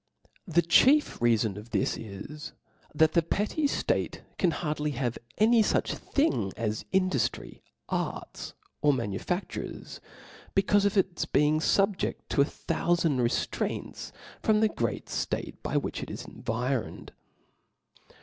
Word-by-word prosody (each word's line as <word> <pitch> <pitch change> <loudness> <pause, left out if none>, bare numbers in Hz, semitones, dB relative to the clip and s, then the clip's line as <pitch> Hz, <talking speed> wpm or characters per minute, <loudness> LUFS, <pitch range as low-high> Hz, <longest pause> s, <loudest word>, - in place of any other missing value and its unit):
The 170 0 +3
chief 270 - +5
rfcaibn 115 -4 +2
of 105 +3 -9
thi^ 105 -4 +1
is^ 115 +9 -5 0.4
that 155 +1 +4
the 170 - +5
petty 210 - -1
ftate - - -1 0.2
can 180 - +4
hardly 150 -2 -2
have 120 -3 -1 0.2
any 225 +2 +5
fuch - - +1
thing 275 - 0
as 110 -2 -2
ih 190 - +4
duftry, 135 -11 -2 0.3
arts, - - -4 0.3
or 145 -1 +4
manuiadures, 120 - -4 0.6
becaufe 200 +1 +3
of 200 - -1
its 185 -2 +1
be 150 - +3
ing 155 +1 +3
fubjedl 195 +3 +2
to 140 - +3
a - - +5
thoiifand 165 -2 0
reftraints 120 -1 -2 0.3
from 215 -1 +3
the 220 - +4
great 115 - -2
ftate - - -3
by - - -1
which - - -2
it - - -6
is - - -6
environed. 125 +2 -3
155 Hz, 135 wpm, -28 LUFS, 120-195 Hz, 0.6 s, chief